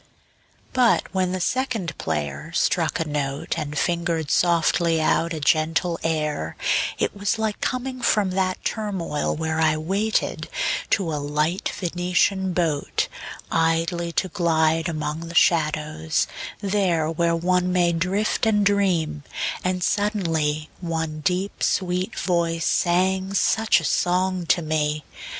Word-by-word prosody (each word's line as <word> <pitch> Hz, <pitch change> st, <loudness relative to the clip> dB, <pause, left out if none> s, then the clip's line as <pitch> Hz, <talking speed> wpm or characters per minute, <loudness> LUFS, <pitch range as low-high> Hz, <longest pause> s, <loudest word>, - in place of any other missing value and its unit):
II. -, -, -33 dB, 0.7 s
But 250 Hz, -2 st, +4 dB
when 185 Hz, -1 st, +1 dB
the 185 Hz, -, -2 dB
second 225 Hz, -, -1 dB
player 75 Hz, -, -3 dB
struck 170 Hz, 0 st, +1 dB
a 165 Hz, -, -1 dB
note 140 Hz, -2 st, -2 dB
And 150 Hz, -2 st, -4 dB
fingered 170 Hz, -3 st, 0 dB
softly 170 Hz, -1 st, +3 dB
out 165 Hz, +1 st, +1 dB
a 160 Hz, -, -3 dB
gentle 160 Hz, +3 st, +1 dB
air 150 Hz, -, -2 dB, 0.4 s
It -, -, -1 dB
was 205 Hz, +3 st, 0 dB
like 220 Hz, -1 st, -2 dB
coming 255 Hz, 0 st, -2 dB
from 210 Hz, -5 st, +2 dB
that 185 Hz, 0 st, -1 dB
turmoil 190 Hz, -9 st, -2 dB
where 160 Hz, 0 st, -2 dB
I 155 Hz, -1 st, +3 dB
waited, 195 Hz, +7 st, -1 dB, 0.4 s
to 175 Hz, -6 st, +1 dB
a 150 Hz, -, -2 dB
light 150 Hz, +5 st, -1 dB
Venetian 180 Hz, +2 st, 0 dB
boat, 165 Hz, -5 st, 0 dB, 0.4 s
Idly 165 Hz, +1 st, +1 dB
to 190 Hz, -, +1 dB
glide 165 Hz, -2 st, +1 dB
among 155 Hz, +1 st, -3 dB
the 170 Hz, -, -8 dB
shadows, 155 Hz, -1 st, +2 dB, 0.4 s
there 190 Hz, -6 st, +1 dB
Where 170 Hz, +1 st, +1 dB
one 180 Hz, +1 st, +1 dB
may 175 Hz, -1 st, +3 dB
drift 190 Hz, +6 st, 0 dB
and 210 Hz, -2 st, +3 dB
dream; 175 Hz, -7 st, +1 dB, 0.4 s
and 185 Hz, 0 st, -1 dB
suddenly 165 Hz, -8 st, 0 dB
One 160 Hz, -3 st, -3 dB
deep 180 Hz, +6 st, -1 dB
sweet 185 Hz, +2 st, 0 dB
voice 170 Hz, -2 st, 0 dB
sang 190 Hz, +2 st, +1 dB
such 220 Hz, +2 st, +3 dB
a -, -, -8 dB
song 180 Hz, +2 st, +1 dB
to 170 Hz, -, +2 dB
me. 155 Hz, -1 st, -1 dB
170 Hz, 130 wpm, -23 LUFS, 155-190 Hz, 0.7 s, But